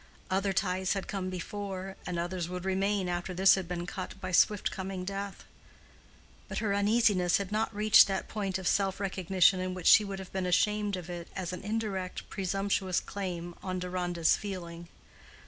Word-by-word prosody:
Other 195 Hz, +1 st, +1 dB
ties 185 Hz, -1 st, 0 dB
had 195 Hz, -2 st, -4 dB
come 190 Hz, -2 st, -3 dB
before, 190 Hz, +1 st, -5 dB
and 180 Hz, -1 st, -2 dB
others 175 Hz, 0 st, -2 dB
would 180 Hz, 0 st, -5 dB
remain 195 Hz, 0 st, +1 dB
after 175 Hz, +1 st, -3 dB
this 190 Hz, +1 st, +6 dB
had 190 Hz, -3 st, -1 dB
been 175 Hz, 0 st, -3 dB
cut 185 Hz, +1 st, -6 dB
by 185 Hz, -1 st, -5 dB
swift 205 Hz, +2 st, +3 dB
coming 190 Hz, -1 st, -5 dB
death. 195 Hz, 0 st, -5 dB, 1.0 s
But -, -, -5 dB
her 210 Hz, -3 st, 0 dB
uneasiness 200 Hz, -3 st, +3 dB
had 200 Hz, -1 st, -4 dB
not 220 Hz, +1 st, 0 dB
reached 215 Hz, 0 st, +6 dB
that 195 Hz, -1 st, -2 dB
point 195 Hz, -3 st, -2 dB
of 190 Hz, -1 st, -4 dB
self 195 Hz, -1 st, +1 dB
recognition 190 Hz, -1 st, +3 dB
in 185 Hz, 0 st, -3 dB
which 180 Hz, -2 st, -7 dB
she 215 Hz, -, +8 dB
would 200 Hz, -1 st, -5 dB
have 190 Hz, -1 st, -9 dB
been 190 Hz, -1 st, -1 dB
ashamed 210 Hz, +2 st, +2 dB
of 175 Hz, -2 st, -7 dB
it 175 Hz, -1 st, -6 dB
as 180 Hz, -2 st, -3 dB
an 180 Hz, -, -6 dB
indirect, 205 Hz, -3 st, -3 dB
presumptuous 195 Hz, -1 st, 0 dB
claim 175 Hz, -3 st, -5 dB
on 185 Hz, -1 st, -3 dB
Deronda's 180 Hz, -2 st, +1 dB
feeling. 170 Hz, -4 st, -6 dB
190 Hz, 180 wpm, -30 LUFS, 180-200 Hz, 1.0 s, she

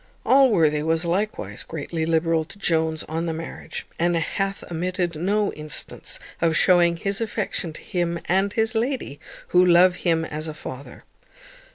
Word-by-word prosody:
Allworthy 190 Hz, -, +4 dB
was 160 Hz, +2 st, +1 dB
likewise 170 Hz, -, -2 dB
greatly 160 Hz, +1 st, -4 dB
liberal 165 Hz, 0 st, +2 dB
to 195 Hz, +5 st, -12 dB
Jones 160 Hz, -4 st, 0 dB
on 165 Hz, +2 st, -3 dB
the 165 Hz, -, -1 dB
marriage, 165 Hz, +1 st, -7 dB
and 175 Hz, +1 st, +2 dB
hath 195 Hz, +4 st, -2 dB
omitted 175 Hz, +1 st, -1 dB
no 200 Hz, +6 st, 0 dB
instance 150 Hz, -1 st, -6 dB, 0.2 s
of 165 Hz, -1 st, +3 dB
shewing 175 Hz, -2 st, +4 dB
his 200 Hz, +5 st, -2 dB
affection 210 Hz, -6 st, -2 dB
to -, -, -9 dB
him 170 Hz, -1 st, -1 dB
and 195 Hz, +3 st, +2 dB
his 225 Hz, +1 st, +1 dB
lady, 230 Hz, -, -2 dB, 0.3 s
who 180 Hz, 0 st, +5 dB
love 180 Hz, +1 st, +5 dB
him 165 Hz, -3 st, +1 dB
as 155 Hz, 0 st, -5 dB
a 155 Hz, -, -6 dB
father. 140 Hz, -2 st, -9 dB
170 Hz, 155 wpm, -24 LUFS, 160-195 Hz, 0.3 s, who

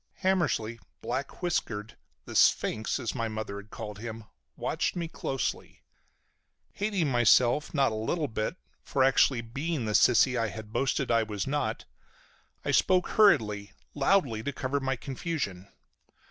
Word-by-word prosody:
Hammersly, 155 Hz, -12 st, +1 dB, 0.2 s
black 135 Hz, +8 st, -4 dB
whiskered, 110 Hz, -11 st, -2 dB, 0.3 s
the -, -, -8 dB
"sphinx" 110 Hz, +5 st, +2 dB
as 120 Hz, -4 st, -3 dB
my 115 Hz, -, -2 dB
mother 110 Hz, -2 st, -5 dB
had 100 Hz, +1 st, -10 dB
called 105 Hz, -2 st, -7 dB
him, 115 Hz, 0 st, -6 dB, 0.3 s
watched -, -, -1 dB
me 170 Hz, -2 st, -2 dB
closely. 135 Hz, -4 st, -4 dB, 0.9 s
Hating 200 Hz, -6 st, -1 dB
myself 120 Hz, +2 st, +4 dB
not 135 Hz, -5 st, +2 dB
a -, -, -4 dB
little 145 Hz, +9 st, -1 dB
bit 110 Hz, +5 st, -3 dB, 0.3 s
for 135 Hz, -, +1 dB
actually 130 Hz, -2 st, +4 dB
being 135 Hz, +4 st, -3 dB
the 110 Hz, -, -1 dB
sissy 125 Hz, +3 st, +5 dB
I 115 Hz, -2 st, +1 dB
had 110 Hz, 0 st, -8 dB
boasted 135 Hz, -1 st, 0 dB
I 115 Hz, 0 st, +4 dB
was 105 Hz, -3 st, -3 dB
not, 145 Hz, +1 st, -2 dB, 0.8 s
I -, -, +1 dB
spoke 185 Hz, -1 st, +3 dB
hurriedly, 105 Hz, -, +3 dB, 0.2 s
loudly, 140 Hz, -, +2 dB
to 140 Hz, -, -3 dB
cover 140 Hz, +1 st, -2 dB
my 135 Hz, -1 st, -1 dB
confusion. 130 Hz, -, -4 dB
125 Hz, 145 wpm, -29 LUFS, 110-145 Hz, 0.9 s, sissy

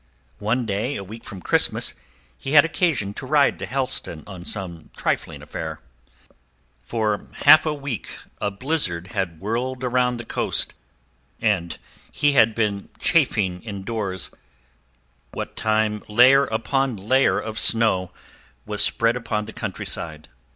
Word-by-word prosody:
One 115 Hz, +4 st, 0 dB
day, 110 Hz, +7 st, -2 dB
a 100 Hz, -, -5 dB
week 110 Hz, +4 st, -10 dB
from 95 Hz, -2 st, -9 dB
Christmas, -, -, +3 dB, 0.4 s
he 135 Hz, -, -5 dB
had 145 Hz, 0 st, +8 dB
occasion 155 Hz, -, 0 dB
to 130 Hz, -, -6 dB
ride 145 Hz, 0 st, +3 dB
to -, -, -5 dB
Helston 130 Hz, -, -1 dB
on 95 Hz, -3 st, -9 dB
some 85 Hz, -7 st, -2 dB
trifling -, -, -2 dB
affair. -, -, -6 dB, 1.0 s
For 105 Hz, -, -2 dB, 0.2 s
half 155 Hz, +1 st, +8 dB
a 155 Hz, -, +1 dB
week 140 Hz, -5 st, -5 dB, 0.2 s
a 105 Hz, -, 0 dB
blizzard 100 Hz, -, 0 dB
had 95 Hz, -6 st, -3 dB
whirled 125 Hz, +5 st, -3 dB
about 125 Hz, -1 st, +1 dB
the 120 Hz, -, -7 dB
coast, -, -, +1 dB, 0.7 s
and 95 Hz, -6 st, 0 dB, 0.3 s
he 145 Hz, -, +2 dB
had 115 Hz, -5 st, +4 dB
been 105 Hz, -3 st, -1 dB
kept -, -, -29 dB
chafing 105 Hz, -, +2 dB
indoors 100 Hz, -2 st, -4 dB, 1.0 s
what -, -, -6 dB
time 110 Hz, -1 st, 0 dB
layer 130 Hz, +6 st, +6 dB
upon 125 Hz, +2 st, -1 dB
layer 130 Hz, +8 st, +2 dB
of 110 Hz, 0 st, -5 dB
snow 110 Hz, -6 st, +3 dB, 0.5 s
was 105 Hz, -1 st, +1 dB
spread 115 Hz, +2 st, +3 dB
upon 110 Hz, -3 st, -2 dB
the 110 Hz, -, -9 dB
countryside. 85 Hz, -8 st, -3 dB
110 Hz, 135 wpm, -23 LUFS, 100-130 Hz, 1.0 s, had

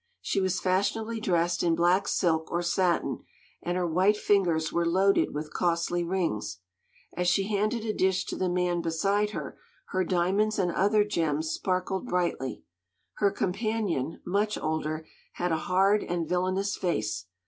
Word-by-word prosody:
She 195 Hz, -, -1 dB
was 185 Hz, -1 st, 0 dB
fashionably 205 Hz, +5 st, 0 dB
dressed 175 Hz, -4 st, +1 dB
in 170 Hz, -1 st, +2 dB
black 175 Hz, +4 st, +3 dB
silk 160 Hz, -3 st, +1 dB
or 175 Hz, +1 st, 0 dB
satin, 175 Hz, 0 st, +1 dB, 0.4 s
and 175 Hz, +1 st, -2 dB
her 180 Hz, -, 0 dB
white 185 Hz, +5 st, +3 dB
fingers 175 Hz, -7 st, +1 dB
were 170 Hz, -, +2 dB
loaded 190 Hz, +4 st, +3 dB
with 150 Hz, +1 st, -5 dB
costly 175 Hz, 0 st, 0 dB
rings. 165 Hz, -, -2 dB, 0.6 s
As 180 Hz, 0 st, 0 dB
she 195 Hz, +2 st, +2 dB
handed 215 Hz, +2 st, 0 dB
a 215 Hz, -, -1 dB
dish 190 Hz, 0 st, +1 dB
to -, -, -4 dB
the 185 Hz, -, -1 dB
man 175 Hz, -1 st, 0 dB
beside 195 Hz, +6 st, +1 dB
her, 210 Hz, -, -6 dB, 0.3 s
her 185 Hz, 0 st, 0 dB
diamonds 190 Hz, +5 st, +1 dB
and 180 Hz, -3 st, +1 dB
other 205 Hz, +4 st, +3 dB
gems 160 Hz, -6 st, -1 dB
sparkled 190 Hz, +4 st, -2 dB
brightly. 175 Hz, -, -1 dB, 0.5 s
Her 200 Hz, -, +3 dB
companion, 195 Hz, -, -2 dB
much 205 Hz, +3 st, 0 dB
older, 155 Hz, 0 st, -2 dB, 0.3 s
had 180 Hz, 0 st, -2 dB
a 160 Hz, -, +2 dB
hard 195 Hz, +3 st, +3 dB
and 170 Hz, -2 st, -2 dB
villainous 185 Hz, +3 st, 0 dB
face. 105 Hz, -, -2 dB
180 Hz, 155 wpm, -28 LUFS, 170-200 Hz, 0.6 s, black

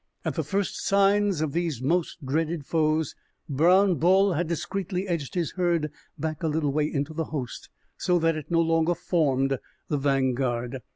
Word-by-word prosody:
At -, -, 0 dB
the -, -, -1 dB
first 200 Hz, -1 st, -2 dB
signs 200 Hz, -3 st, +3 dB
of 155 Hz, -2 st, 0 dB
these 165 Hz, -5 st, -1 dB
most 165 Hz, +2 st, -1 dB
dreaded 155 Hz, +2 st, -1 dB
foes, 155 Hz, -1 st, +1 dB, 0.3 s
Brown 180 Hz, +6 st, +4 dB
Bull 190 Hz, +3 st, +4 dB
had 170 Hz, +1 st, -1 dB
discreetly 185 Hz, +3 st, -3 dB
edged 165 Hz, -5 st, -3 dB
his 170 Hz, -4 st, 0 dB
herd 170 Hz, -5 st, 0 dB, 0.3 s
back 155 Hz, 0 st, -3 dB
a 165 Hz, -, 0 dB
little 150 Hz, -2 st, 0 dB
way 150 Hz, 0 st, +1 dB
into 145 Hz, +1 st, -2 dB
the 160 Hz, 0 st, -2 dB
host, 135 Hz, -6 st, -6 dB, 0.3 s
so 180 Hz, -, +2 dB
that 165 Hz, -1 st, +2 dB
it 155 Hz, -2 st, -7 dB
no 165 Hz, -1 st, +3 dB
longer 165 Hz, +1 st, +2 dB
formed 135 Hz, -7 st, +1 dB, 0.3 s
the 150 Hz, -, +1 dB
vanguard. 130 Hz, -2 st, 0 dB
160 Hz, 170 wpm, -26 LUFS, 145-175 Hz, 0.3 s, Brown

